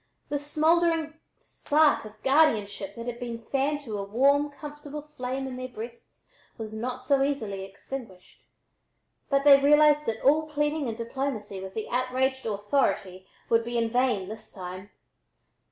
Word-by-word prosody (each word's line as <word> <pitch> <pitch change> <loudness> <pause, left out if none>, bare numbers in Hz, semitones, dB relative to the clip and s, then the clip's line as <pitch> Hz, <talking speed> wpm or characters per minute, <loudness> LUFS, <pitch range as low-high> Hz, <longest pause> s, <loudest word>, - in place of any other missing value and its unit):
The 290 - -1
smoldering 320 +2 +2 0.2
spark 300 -4 +2
of 215 0 -13
guardianship 215 -9 +2
that 230 - -7
had 240 -1 -5
been 240 -2 -4
fanned 285 +2 +1
to 220 -7 -5
a - - -2
warm, 280 +8 +3
comfortable 295 0 -8
flame 260 +2 -3
in 260 -1 -6
their 255 0 -4
breasts 235 0 -10 0.3
was 220 -1 -6
not 250 +3 -4
so 275 0 +3
easily 220 -9 -1
extinguished, 195 0 -9 0.9
but 275 -1 +2
they 280 -1 +8
realized 295 +1 +5
that 225 -1 -2
all 310 +3 +4
pleading 295 -1 0
and 225 -1 -4
diplomacy 230 -5 -4
with 190 0 -8
the 220 - -3
outraged 255 +1 0
Authority 200 -3 -1 0.2
would 230 0 +3
be 240 +1 -3
in 230 -1 0
vain 245 -6 +1
this 215 +2 -9
time. 185 +1 -8
255 Hz, 155 wpm, -27 LUFS, 220-285 Hz, 0.9 s, they